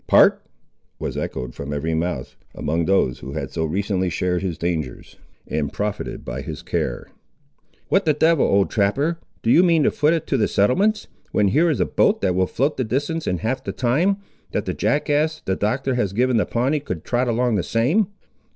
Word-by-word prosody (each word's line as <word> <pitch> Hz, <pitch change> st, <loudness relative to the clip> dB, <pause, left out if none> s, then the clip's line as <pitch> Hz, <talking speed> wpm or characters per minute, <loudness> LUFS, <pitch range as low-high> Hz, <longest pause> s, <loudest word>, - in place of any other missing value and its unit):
"Part!" -, -, +6 dB, 0.6 s
was -, -, -4 dB
echoed 60 Hz, -2 st, -4 dB
from 70 Hz, +1 st, -6 dB
every 75 Hz, +3 st, -2 dB
mouth, 80 Hz, -6 st, -2 dB, 0.2 s
among 80 Hz, +2 st, -1 dB
those 85 Hz, -10 st, +2 dB
who 65 Hz, -, -7 dB
had 70 Hz, -3 st, -4 dB
so 80 Hz, -1 st, -1 dB
recently 95 Hz, +2 st, -1 dB
shared 90 Hz, +1 st, -1 dB
his 90 Hz, -4 st, -3 dB
dangers, 80 Hz, -7 st, -4 dB, 0.3 s
and 75 Hz, -2 st, -2 dB
profited 105 Hz, -1 st, -4 dB
by -, -, -4 dB
his -, -, -7 dB
care. -, -, -3 dB, 0.8 s
"What 195 Hz, -, +2 dB
the 155 Hz, -, +4 dB
devil, 160 Hz, 0 st, +3 dB
old 100 Hz, 0 st, +2 dB
trapper, 140 Hz, +11 st, +1 dB, 0.2 s
do 115 Hz, -, +2 dB
you 170 Hz, -, +7 dB
mean 170 Hz, -4 st, +4 dB
to -, -, +3 dB
foot 150 Hz, +3 st, +2 dB
it 160 Hz, -1 st, -3 dB
to 135 Hz, -, 0 dB
the 110 Hz, -, +2 dB
settlements, 200 Hz, -, +2 dB, 0.3 s
when 105 Hz, -2 st, +3 dB
here 160 Hz, -, +3 dB
is 150 Hz, -, 0 dB
a -, -, +3 dB
boat -, -, +2 dB
that 95 Hz, -2 st, +2 dB
will 95 Hz, +1 st, +1 dB
float 140 Hz, +9 st, 0 dB
the 130 Hz, -, 0 dB
distance 145 Hz, +8 st, -2 dB
in 90 Hz, -, 0 dB
half 130 Hz, -, -2 dB
the -, -, -3 dB
time, 155 Hz, +11 st, +1 dB, 0.4 s
that -, -, -1 dB
the -, -, -2 dB
jackass, 150 Hz, +1 st, 0 dB
the 95 Hz, -, 0 dB
Doctor 130 Hz, +7 st, 0 dB
has 105 Hz, -6 st, 0 dB
given 125 Hz, +2 st, +2 dB
the 110 Hz, -, +1 dB
Pawnee, 130 Hz, +6 st, +1 dB
could 90 Hz, -, -5 dB
trot 125 Hz, +1 st, 0 dB
along 120 Hz, +1 st, +1 dB
the 100 Hz, -, +2 dB
same." 140 Hz, -, +1 dB
115 Hz, 200 wpm, -22 LUFS, 90-145 Hz, 0.8 s, you